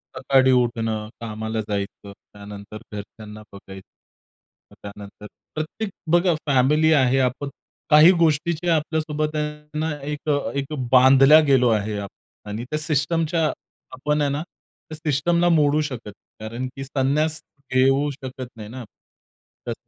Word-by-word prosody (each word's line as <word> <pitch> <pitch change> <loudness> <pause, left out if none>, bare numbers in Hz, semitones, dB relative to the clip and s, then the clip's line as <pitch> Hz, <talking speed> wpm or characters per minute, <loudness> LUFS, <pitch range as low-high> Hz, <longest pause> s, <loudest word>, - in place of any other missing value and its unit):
सकाळी 130 0 +3
उठणं, 115 -3 0
कामाला 110 0 -4
जायचं, 100 0 -5 0.2
त्यानंतर 100 +1 -10
घरच्यांना 105 +1 -9
बघायचं. 95 -1 -12 0.8
अ, - - -17
त्यानंतर 100 0 -10 0.3
प्रत्येक 155 +8 -4 0.3
बघा 175 0 +3
फॅमिली 145 +4 +3
आहे 135 -2 +3
आपण, 130 +2 -1 0.4
काही 155 +3 +8
गोष्टीच्या 165 +1 +1
आपल्यासोबत 155 -1 -2
आहे 150 0 -5
ना, 160 +1 -1
एक 150 +2 -5 0.3
एक 140 +2 -3 0.2
बांधल्या 135 +3 +7
गेलो 130 -3 +4
आहे 105 -1 0
आप 100 -1 -6 0.4
आणि 105 +3 -5
त्या 150 - -1
सिस्टमच्या 160 +2 0 0.5
आपण 150 +3 -1
आहे 145 - +1
ना, 145 +2 -2
त्या 160 -2 -15
सिस्टमला 165 +3 +1
मोडू 155 -2 +3
शकतं. 125 -8 -6 0.3
कारण 115 +4 -5
की 135 - -6
संन्यास 145 +4 0 0.3
घेऊ 135 +3 +3
शकत 130 -2 -8
नाही 105 -1 -9
ना. 125 +2 -8 0.8
तर - - -1
135 Hz, 130 wpm, -22 LUFS, 115-155 Hz, 0.8 s, काही